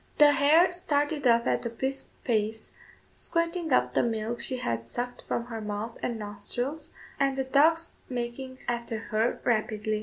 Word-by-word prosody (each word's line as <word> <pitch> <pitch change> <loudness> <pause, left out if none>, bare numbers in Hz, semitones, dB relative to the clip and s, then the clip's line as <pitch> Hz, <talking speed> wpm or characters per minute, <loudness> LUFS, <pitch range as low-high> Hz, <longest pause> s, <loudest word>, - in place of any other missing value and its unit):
The 295 -1 +8
hare 295 +6 +5
started 295 -4 0
off 235 0 +4
at - - +1
a 235 - -2
brisk 265 +4 -3 0.2
pace, 220 -2 -1 0.4
squirting 335 -1 -1
up - - +3
the - - +3
milk 225 0 -1
she 260 - 0
had 115 - -2
sucked 245 - -4
from 235 - -1
her 225 -2 -6
mouth 210 +2 -4
and 235 - -2
nostrils, 245 +8 -4 0.3
and 275 -1 +2
the 265 - +1
dogs 320 +5 +3
making 255 +1 -4
after 235 -1 -2
her 220 +1 0
rapidly. 215 -2 0
245 Hz, 160 wpm, -28 LUFS, 220-285 Hz, 0.4 s, The